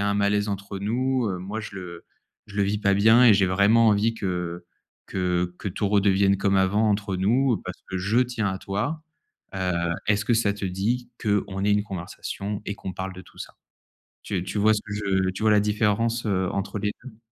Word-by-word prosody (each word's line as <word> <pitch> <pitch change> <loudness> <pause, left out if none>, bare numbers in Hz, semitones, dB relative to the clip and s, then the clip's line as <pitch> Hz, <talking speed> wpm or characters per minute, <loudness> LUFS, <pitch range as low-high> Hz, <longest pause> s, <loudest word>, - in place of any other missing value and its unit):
a 100 - +1
un 100 - +1
malaise 105 +1 +1
entre 100 0 -4
nous, 125 +4 0
heu, 95 -2 -3
moi 100 +5 -5
je 110 -2 -8
le 90 -3 -9 0.4
je 105 - -12
le 100 - +3
vis 100 +1 0
pas 100 -1 +2
bien 110 +5 +6
et 110 - +8
j'ai 100 - +3
vraiment 100 +5 +4
envie 110 +2 +2
que 90 -4 -4 0.4
que 90 -1 -1
que - - -4
tout 100 +2 -2
redevienne 100 -1 +3
comme 100 0 +2
avant 100 +3 +2
entre 100 -2 -1
nous, 120 +6 +2
parce 90 - -6
que 95 - -2
je 100 +6 +1
tiens 120 -5 0
à 95 - -2
toi. 120 +13 -3 0.5
Heu, 95 -1 -1 0.4
est-ce 105 0 +2
que 120 - +3
ça 110 -3 +2
te 100 - -6
dit 115 +7 -2
qu'on 100 -2 0
ait 105 - +2
une 105 0 +2
conversation 100 +2 -5
et 100 - -2
qu'on 95 - -7
parle 95 +1 -4
de 95 - -9
tout - - -20
ça». - - -8 0.7
Tu 95 -4 -2
tu 95 - -4
vois 110 +1 +5
ce 105 - -1
que 105 - -6
je 95 -2 0
tu 95 - -6
vois 110 - +4
la 105 - +5
différence, 105 +2 0
heu, 95 -3 0
entre 100 +1 -3
les 105 +1 -1
2? 125 -4 -11
100 Hz, 220 wpm, -25 LUFS, 95-110 Hz, 0.7 s, et